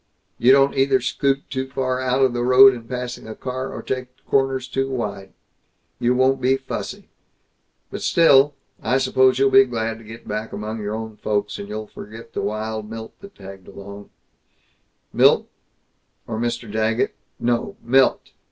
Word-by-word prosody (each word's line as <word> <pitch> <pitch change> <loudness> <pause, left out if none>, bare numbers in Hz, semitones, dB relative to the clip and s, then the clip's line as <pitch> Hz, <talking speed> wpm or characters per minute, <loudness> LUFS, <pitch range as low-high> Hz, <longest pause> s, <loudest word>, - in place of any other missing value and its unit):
You 125 +2 +5
don't 135 0 +5
either 135 0 +3
scoot 135 +2 -1
too 130 -1 -2
far 130 -1 -1
out 130 +1 +1
of 130 -2 +3
the 120 - -2
road 130 +2 +8
in 115 -2 -9
passing 125 -2 -5
a 110 - -7
car, 130 +1 -5
or - - -7
take 130 -1 -3 0.2
corners 135 -1 +1
too 135 +1 -2
wide. 105 -7 -4 0.7
You 125 +1 +2
won't 130 +1 +2
be 130 +1 +3
fussy. 135 0 -6 0.8
But - - -6
still, 145 -3 +5 0.3
I 125 +4 +1
suppose 130 -1 +3
you'll 135 0 +3
be 135 - +8
glad 115 -2 -3
to - - -14
be 110 +1 -9
back 110 -1 -6
among 110 +2 -5
your 105 +1 -3
own 110 -1 -7
folks 105 -1 -2
and 100 - -7
you'll 110 +1 -5
forget 115 +2 -11
the - - -2
wild 110 0 -4
Milt 110 0 -8
that 200 0 -13
tagged 95 -1 -12
along 100 +1 -11 0.5
" - - -44
"Milt - - +4 0.8
or 110 -1 -4
Mr. 120 -2 -3
Daggett 110 +2 0 0.3
no, 120 0 -1
Milt! 130 +3 +2
120 Hz, 170 wpm, -22 LUFS, 110-130 Hz, 0.8 s, road